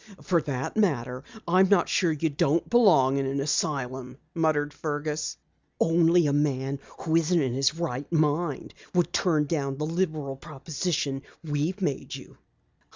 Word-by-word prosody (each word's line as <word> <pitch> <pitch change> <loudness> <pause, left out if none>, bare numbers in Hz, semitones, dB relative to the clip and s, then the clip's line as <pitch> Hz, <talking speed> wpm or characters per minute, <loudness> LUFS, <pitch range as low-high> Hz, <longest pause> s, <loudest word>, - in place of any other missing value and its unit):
"For 170 -3 +2
that 135 -3 -4
matter, 130 - 0 0.2
I'm 185 +2 +4
not 200 -3 +4
sure 175 -4 +2
you 155 +1 -1
don't 145 +3 +1
belong 165 - +5
in 135 -1 0
an 135 +1 -1
asylum," 130 -3 -2 0.2
muttered 155 -3 +1
Fergus. 150 0 -3 0.4
"Only 170 +1 +4
a 145 - +1
man 140 -2 0 0.2
who 160 -1 0
isn't 165 +1 +2
in 130 -5 0
his 135 +3 +1
right 145 -5 -4
mind 155 -2 0 0.2
would 175 -1 +2
turn 155 -5 +2
down 140 -3 -2
the 150 - -2
liberal 155 -5 -2
proposition 145 -1 -3 0.2
we've 160 +6 -2
made 145 -6 -2
you." - - -12
150 Hz, 150 wpm, -27 LUFS, 135-170 Hz, 0.4 s, belong